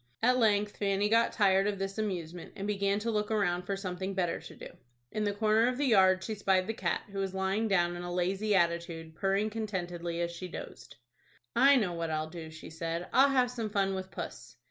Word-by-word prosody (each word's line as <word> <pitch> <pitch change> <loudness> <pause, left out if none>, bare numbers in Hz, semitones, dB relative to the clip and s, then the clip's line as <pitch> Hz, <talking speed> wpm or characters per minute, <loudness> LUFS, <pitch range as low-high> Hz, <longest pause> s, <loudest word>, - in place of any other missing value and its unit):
At 250 +2 +4
length 210 -2 +2
Fanny 200 0 +1
got 230 +1 +4
tired 195 -1 +3
of 205 -1 -1
this 195 +2 -4
amusement, 180 -5 -4
and 200 -1 -5
began 200 -1 0
to 230 +1 -1
look 210 -1 -1
around 180 -5 0
for 195 - -1
something 190 0 -4
better 175 -3 0
to - - -12
do. - - -9 0.4
In 215 - -1
the 205 - +1
corner 215 +2 +3
of 250 0 -1
the 290 - +1
yard 190 -6 +5
she 220 - -3
spied 190 -3 +2
the 225 - -2
cat, - - -1
who 195 - -4
was 190 -1 -2
lying 190 +4 0
down 175 -4 +2
in 175 - -6
a 175 0 -5
lazy 190 +4 0
attitude, 170 -2 0
purring 195 +4 0
contentedly 175 -6 -4
as 170 0 -1
she 170 +2 -7
dozed. - - -9 0.6
"I 280 +1 +7
know 205 -9 +1
what 170 -1 -3
I'll 155 0 -2
do," 165 -2 -7
she 160 0 -11
said; 165 +2 -4
"I'll 275 +2 +6
have 255 -2 +2
some 230 -3 -3
fun 195 -2 +1
with 190 0 -5
puss." 120 -9 -8
195 Hz, 220 wpm, -30 LUFS, 175-210 Hz, 0.6 s, I